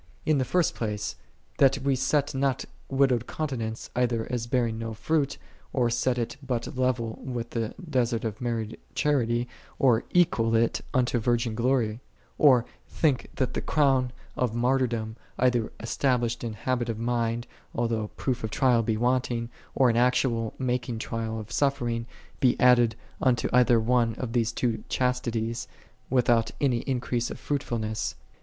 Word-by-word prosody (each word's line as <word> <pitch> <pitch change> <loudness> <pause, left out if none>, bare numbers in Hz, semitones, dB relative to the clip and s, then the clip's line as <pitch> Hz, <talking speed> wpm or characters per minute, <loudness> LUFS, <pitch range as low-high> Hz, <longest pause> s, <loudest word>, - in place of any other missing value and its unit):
In 155 -3 +3
the 130 - +1
first 180 +4 +2
place, 105 -2 -3 0.4
that 135 0 +5
we 140 0 +1
set 145 +2 +1
not 135 -1 0 0.2
widowed 135 -3 +2
continence 120 -7 -4
either 120 -2 +1
as 120 -2 -2
bear 125 -1 +2
ing 110 -1 -3
no 115 -1 -4
fruit, 140 +5 0 0.4
or 120 -3 +2
set 120 +1 +1
it 120 +2 -3
but 130 -4 -3
level 125 -3 0
with 120 -2 -4
the 115 -1 -2
desert 120 -5 0
of 110 -1 -4
married 115 -2 -3 0.2
charity, 120 -5 +1 0.3
or 120 -4 +4
equal 120 -11 +3
it 115 +1 +2
unto 125 -2 +2
virgin 115 0 +1
glory; 115 -2 +1 0.4
or 130 -5 +6 0.2
think 145 -6 +1
that 130 -2 0
the - - -2
Crown 135 -4 +2 0.2
of 120 -3 0
Martyr 130 +2 +2
dom, 110 -1 -4 0.2
either 125 -3 +2
established 120 0 0
in 115 -2 -3
habit 120 +2 -1
of 115 - -2
mind, 115 0 -1 0.3
al 120 0 +2
though 110 -2 -1
proof 125 -3 -2
of 110 - -1
trial 125 +1 +3
be 110 -1 0
wanting, 120 -1 0 0.3
or 130 - +5
in 115 -1 +2
actual 120 -2 +2
making 125 -2 -1
trial 110 0 -3
of 110 +1 -9
suffering, 120 -4 0 0.3
be 125 -2 +3
added 120 -2 +5 0.3
unto 125 -3 +2
either 125 -1 +5
one 115 0 +2
of 120 -1 -5
those 120 -2 +2
these 115 -1 -1
chastities, 120 -2 -1 0.4
without 120 -3 +3
any 130 -4 +2
in 130 0 -1
crease 120 -1 -1
of - - -7
fruitfulness. 115 -6 -2
120 Hz, 160 wpm, -27 LUFS, 115-130 Hz, 0.4 s, or